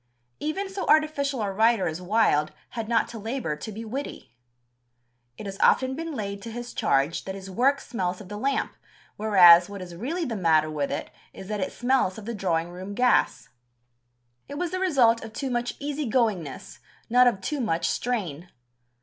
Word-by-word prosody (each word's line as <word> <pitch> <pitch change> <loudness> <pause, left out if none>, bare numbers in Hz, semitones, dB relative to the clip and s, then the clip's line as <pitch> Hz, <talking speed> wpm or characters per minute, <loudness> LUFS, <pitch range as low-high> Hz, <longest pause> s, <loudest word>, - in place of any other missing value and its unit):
Even 350 +7 -2
so 385 0 -5
artificial 290 -5 +2
a 200 - -1
writer 220 -1 +3
as 160 +2 -4
Wilde 180 -6 +2 0.2
had 225 -1 -5
not 230 - +2
to 230 - -8
labour 225 - -3
to 215 - -7
be 220 +2 -7
witty. 240 - -6 1.0
It - - -8
has 195 0 -6
often 260 0 +3
been 325 0 -5
laid 200 -3 -4
to 230 - -7
his 240 +1 -7
charge 140 +5 +1
that 190 - -5
his 195 0 -9
work 270 +7 +2
smells 185 -6 -3
of 205 - -11
the 205 - -7
lamp, 275 +3 -1 0.4
whereas 180 -5 +7
what 200 -1 -7
is 180 -2 -8
really 320 - -3
the 235 -5 -3
matter 160 -5 +2
with 145 -2 -2
it - - -4 0.2
is 190 - -10
that 210 -1 -2
it 185 - -2
smells 245 -6 +1
of 215 - -9
the 235 - -4
drawing 170 -5 -1
room 185 +3 -7
gas. 250 +2 +2 1.0
It 285 - -7
was 345 +1 -2
the 370 - -2
result 255 -11 +3
of 225 -1 -9
too 270 +1 -3
much 240 0 -2
"easy 290 -2 -3
goingness," 210 - -1 0.3
not 250 +2 +5
of 230 -6 +2
too 285 +10 -3
much 165 -7 0
strain. 175 -3 -2
220 Hz, 190 wpm, -26 LUFS, 185-260 Hz, 1.0 s, whereas